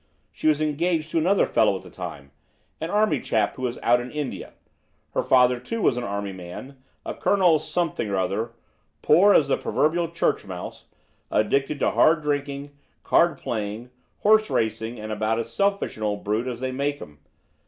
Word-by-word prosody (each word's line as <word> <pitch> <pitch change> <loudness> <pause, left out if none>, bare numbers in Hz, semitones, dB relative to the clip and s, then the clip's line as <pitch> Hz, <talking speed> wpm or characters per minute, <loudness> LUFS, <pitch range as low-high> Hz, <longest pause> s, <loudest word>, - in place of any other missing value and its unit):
She - - -3
was 155 0 +3
engaged 155 +1 -1
to 165 - +2
another 190 +5 +3
fellow - - +2
at - - -12
the - - -13
time, 70 0 -8 0.5
an 160 - -4
army 210 +2 +2
chap 105 -2 0
who - - -10
was 125 -1 -2
out 120 +1 +4
in 125 - -7
India. 150 -1 -5 0.6
Her - - +1
father, 125 -1 +4
too, 230 - -5
was 165 - +2
an 125 - -3
army 100 -2 -3
man, 95 +10 -10 0.2
a - - -3
Colonel 180 -6 +3
Something 165 -8 -2
or 100 - -1
other, 100 +5 -1 0.5
poor 190 +7 +6
as 145 - +4
the 140 - +1
proverbial 165 +2 0
church 170 - 0
mouse, 90 -2 -8 0.4
addicted 135 +7 +1
to - - +2
hard 155 -1 +4
drinking, 145 -1 -2 0.3
card 170 -4 +3
playing, 110 +1 -4 0.3
horse 215 +1 +4
racing, 110 +1 -1
and 110 0 -6
about 110 +1 0
as 115 0 -4
selfish 200 - 0
an - - -10
old 105 -1 -2
brute 110 +4 -1
as 125 -1 -5
they 130 0 -2
make 140 +2 -2
'em. 75 -1 -12
130 Hz, 185 wpm, -24 LUFS, 110-155 Hz, 0.6 s, poor